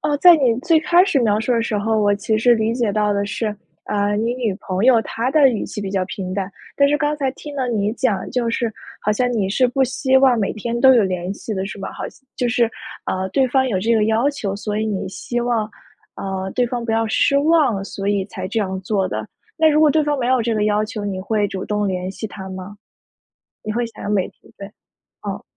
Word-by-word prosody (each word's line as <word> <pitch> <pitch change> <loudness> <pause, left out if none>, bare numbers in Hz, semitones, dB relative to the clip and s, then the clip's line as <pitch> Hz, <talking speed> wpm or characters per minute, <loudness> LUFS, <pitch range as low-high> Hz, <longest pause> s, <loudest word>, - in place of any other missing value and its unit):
哦， 290 - 0
在 350 +3 +8
你 255 -7 +3
最 320 -2 +4
开 350 +3 +5
始 375 -8 +1
描 210 -3 +2
述 225 +3 0
的 230 -1 +2
时 225 -2 -1
候， 220 +1 +1
我 205 -1 +3
其 215 +2 -1
实 240 +2 +5
理 225 +1 0
解 235 -4 0
到 210 0 +1
的 200 0 0
是， 210 +1 -2 0.3
呃， 205 0 0
你 230 +2 0
女 230 -6 -1
朋 190 +3 -1
友 255 -3 +6
她 240 +3 -2
的 285 -2 +6
语 225 - -2
气 - - -8
比 195 -1 -4
较 190 -2 0
平 185 -2 -5
淡。 195 0 -3 0.2
但 280 0 +4
是 295 - +2
刚 295 0 0
才 270 -2 0
听 290 +2 -10
到 260 -2 -1
你 210 -2 0
讲， 230 -5 -1
就 240 -2 -1
是 230 -1 -1 0.3
好 210 - +1
像 250 +3 0
你 215 -5 0
是 250 +5 +3
不 265 +1 +2
希 265 +1 +1
望 260 -3 +5
每 200 - -1
天 235 +2 -3
都 265 0 +7
有 230 -5 +4
联 180 0 -2
系 220 - -6
的 190 -1 -2
是 210 - -7
吧？ 195 - -6
好 - - -5
像 265 - -20
就 245 -2 -1
是， 235 -1 +2 0.3
呃， 190 0 -2
对 265 +3 +2
方 265 0 +2
有 190 -5 0
这 230 +4 +1
个 215 -2 +3
要 225 +5 +2
求， 200 -8 -4
所 210 +1 -3
以 220 - -1
你 200 -2 -2
希 240 +5 -4
望， 230 -3 0 0.4
呃， 190 -1 -4
对 250 -1 +2
方 240 0 -3
不 230 - -3
要 225 0 +1
失 280 +5 +2
望， 285 -10 +3
所 195 0 -4
以 200 -2 +1
才 185 -1 -6
这 225 - -1
样 190 -3 -2
做 195 -1 0
的。 110 -10 -4 0.3
那 315 0 +5
如 305 0 +3
果 305 -2 +6
对 310 +1 +3
方 295 -1 0
没 240 - -1
有 260 -1 +3
这 230 0 0
个 210 - +1
要 210 0 +2
求， 215 -1 -5
你 195 -2 -3
会 205 +1 0
主 190 -1 -5
动 210 -1 -1
联 185 0 -2
系 220 - -6
她 190 -2 -9
吗？ 190 +2 -8 0.9
你 215 - -5
会 235 +3 0
想 230 - -12
要 - - -4
每 205 -3 +1
天 - - -23
对， 195 - -8 0.6
哦。 - - -5
220 Hz, 270 characters per minute, -20 LUFS, 200-250 Hz, 0.9 s, 在